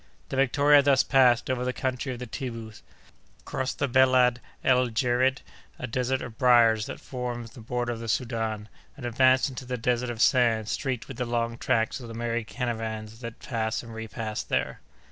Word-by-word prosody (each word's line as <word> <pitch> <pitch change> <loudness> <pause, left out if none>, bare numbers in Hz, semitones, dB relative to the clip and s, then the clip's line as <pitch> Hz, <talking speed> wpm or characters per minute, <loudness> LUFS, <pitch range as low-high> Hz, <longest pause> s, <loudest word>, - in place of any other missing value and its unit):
The - - -4
Victoria 145 +2 +5
thus 140 -1 +4
passed 125 -3 +4
over 130 -1 -1
the 125 0 -1
country 130 +2 -2
of 125 - -5
the 125 - -6
Tibbous, 115 -2 -7 0.6
crossed 130 0 -3
the 140 - 0
Belad 130 -1 +4 0.2
el 125 -1 +4
Djerid, 125 +3 +1 0.3
a - - -5
desert 130 +2 -1
of 110 -2 -9
briers 115 -3 +5
that - - -7
forms 120 -3 -5
the 120 - -12
border 120 +1 -2
of 115 - -7
the 115 - -6
Soudan, 110 -2 -2 0.3
and 130 - -7
advanced 130 +3 +3
into 130 -1 -7
the 125 0 -4
desert 120 +1 0
of 120 -2 -5
sand 115 -4 +3
streaked 130 -4 -2
with 135 - -8
the 125 - -1
long 115 0 -1
tracks 115 +1 0
of 120 - -9
the 115 - -8
many 115 0 -2
caravans 110 -1 -4
that 115 -2 -7
pass 110 -2 -3
and 115 -1 -10
repass 110 -1 -4
there. - - -2
120 Hz, 185 wpm, -27 LUFS, 115-130 Hz, 0.6 s, Victoria